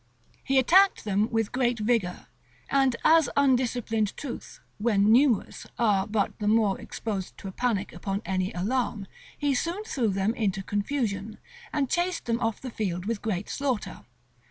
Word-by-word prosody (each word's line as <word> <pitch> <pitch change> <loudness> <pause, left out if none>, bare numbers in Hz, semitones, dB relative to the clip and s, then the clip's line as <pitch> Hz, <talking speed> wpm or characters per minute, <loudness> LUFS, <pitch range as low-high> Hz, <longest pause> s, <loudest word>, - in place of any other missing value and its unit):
He 270 - +1
attacked 370 +9 +5
them 210 +1 +1
with 225 -2 0
great 245 -2 +1
vigor; 215 -5 0 0.5
and 270 -3 +3
as 320 -1 +5
undisciplined 245 -5 +1
troops, 275 -5 -7 0.2
when 210 -1 +3
numerous, 245 -2 +2
are 205 -4 +2
but 210 -2 -1
the 210 - -2
more 210 -2 +2
exposed 200 -5 -5
to 195 - -8
a - - -5
panic 210 -2 -1
upon 195 +2 -4
any 185 0 -1
alarm, 215 +2 -1 0.3
he 290 -1 +1
soon 340 +10 -2
threw 260 - -1
them 195 +2 0
into 195 -4 -1
confusion, 205 -1 -2 0.3
and 285 -3 0
chased 350 +5 -1
them 230 0 0
off 225 -2 -1
the 255 - -7
field 185 -5 -3
with 225 -1 -2
great 205 -3 -2
slaughter. 265 -6 -2
225 Hz, 155 wpm, -27 LUFS, 200-260 Hz, 0.5 s, attacked